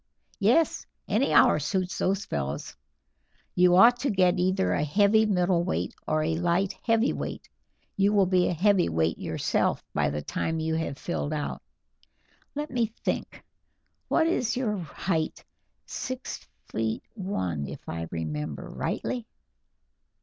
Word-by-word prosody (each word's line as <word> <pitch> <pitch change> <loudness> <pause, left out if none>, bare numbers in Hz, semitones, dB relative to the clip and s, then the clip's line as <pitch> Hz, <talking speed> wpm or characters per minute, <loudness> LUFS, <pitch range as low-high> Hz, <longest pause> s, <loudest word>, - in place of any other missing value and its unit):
"Yes, 240 +11 +2 0.2
any 230 +7 +1
hour - - +6
suits 185 +4 -2
those 195 +1 0
fellows. 70 0 -4 0.8
You 180 0 +5
ought 240 +6 +7
to 275 - 0
get 185 -2 +3
either 185 +1 +2
a - - +1
heavy 205 +7 +4
middleweight 180 -2 +1
or 155 0 +1
a 160 +1 0
light 175 +3 +1
heavyweight; 230 +2 0 0.5
you 200 +1 +4
will 200 -2 +4
be 180 -1 +3
a - - 0
heavyweight 150 - +2
yourself - - 0
by - - +1
the 75 0 -4
time 160 - -2
you 160 0 -1
have 160 -4 -2
filled 155 -2 -3
out. 150 -1 -3 0.9
Let 295 0 -4
me 240 -3 +1 0.2
think; - - -3 0.6
what 320 - +3
is 250 -9 0
your 215 -6 -1
height 165 0 -2 0.4
six 255 0 -6 0.2
feet 110 0 -2
one, 95 - -3
if - - -9
I 85 0 -4
remember 75 -2 -4
rightly?" 240 -3 -3
180 Hz, 135 wpm, -27 LUFS, 150-210 Hz, 0.9 s, ought